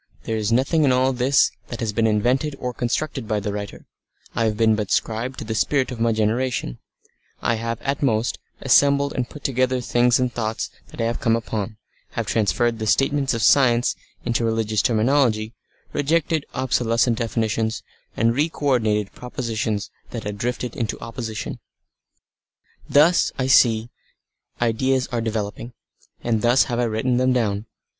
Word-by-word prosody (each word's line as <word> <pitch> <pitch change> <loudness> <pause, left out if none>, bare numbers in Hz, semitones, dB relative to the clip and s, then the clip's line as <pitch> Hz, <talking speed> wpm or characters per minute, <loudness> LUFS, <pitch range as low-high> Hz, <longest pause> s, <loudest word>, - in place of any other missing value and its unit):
There 115 - -2
is 110 0 -1
nothing 135 +7 +2
in 135 - +4
all 130 +1 +3
this 130 +2 +3 0.2
that 120 - -6
has 110 -3 -2
been 110 +1 +2
invented 125 +7 +1
or 125 -2 -4
constructed 125 +1 -2
by 105 -1 0
the 105 0 -3
writer; 100 -1 -6 0.5
I 115 - +1
have 105 -1 0
been 110 -1 +4
but 105 -2 -3
scribe 120 +4 -1
to - - -5
the 110 - -3
spirit 130 +4 +1
of 120 - -6
my 115 0 +2
generation; 110 - -1 0.6
I 120 - +1
have 115 -1 -3
at 140 0 -1
most 115 -4 +1 0.2
assembled 140 0 +4
and 125 -1 -2
put 150 - -11
together 130 -1 +1
things 120 0 +2
and 125 -2 0
thoughts 110 -1 -3 0.2
that - - -14
I - - +1
have 115 +1 -1
come 115 -1 +2
upon, 110 -2 -4 0.4
have - - -2
transferred 115 +2 +1
the 110 - -3
statements 135 +2 +2
of 115 - -2
"science" 120 -4 +4 0.3
into 120 -1 0
religious 110 -2 +1
terminology, 115 -2 +2 0.4
rejected 155 +1 0
obsolescent 120 -2 +1
definitions, 110 -1 -1 0.3
and 115 +1 +3
re 150 +6 +1
coordinated 110 -9 0
propositions 115 -4 -3 0.2
that 115 -3 -6
had 105 0 -5
drifted 125 +1 -3
into 115 -3 -3
opposition. 115 -2 -5 1.3
Thus, 160 +5 +4
I 130 - 0
see, 115 -3 +4 0.7
ideas 130 +3 +1
are 120 -1 -1
developing, 110 +1 -4 0.5
and 115 -2 0
thus 120 +4 +5
have 120 -2 -3
I 120 - +2
written 115 +3 0
them 130 0 +3
down. 110 -3 -1
115 Hz, 165 wpm, -22 LUFS, 110-130 Hz, 1.3 s, thus